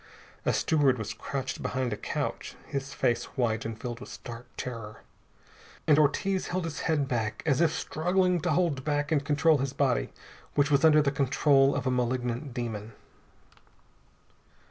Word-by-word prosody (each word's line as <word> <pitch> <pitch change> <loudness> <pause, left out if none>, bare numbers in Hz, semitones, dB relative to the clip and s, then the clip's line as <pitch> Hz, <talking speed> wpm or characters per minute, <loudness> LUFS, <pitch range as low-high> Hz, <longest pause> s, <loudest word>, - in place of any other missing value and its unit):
A - - +5
steward 145 -5 +2
was 110 -1 -4
crouched 135 -1 -4
behind 125 -2 -1
a - - -1
couch, - - -4
his 140 0 -4
face 120 -2 0
white 115 -3 0
and 110 -1 -5
filled 120 -1 -5
with 130 - -10
stark 120 0 -9
terror. 115 -4 -6 0.8
And 150 -1 +5
Ortiz 190 +6 +1
held 185 0 -2
his 160 -3 -5
head 145 -4 +2
back, 110 -4 -2
as 150 -1 +2
if 165 -2 +4
struggling 180 +3 +1
to 175 - -1
hold 155 -5 +1
back 145 0 -1
and 145 -3 +2
control 150 +1 +3
his 135 0 -2
body, - - +1 0.5
which 145 0 +2
was 140 +1 +4
under 155 -1 +6
the 140 - +1
control 140 0 +3
of 140 -2 -2
a 130 - +2
malignant 125 +2 -1
demon. 115 -3 -5
140 Hz, 165 wpm, -28 LUFS, 120-150 Hz, 0.8 s, under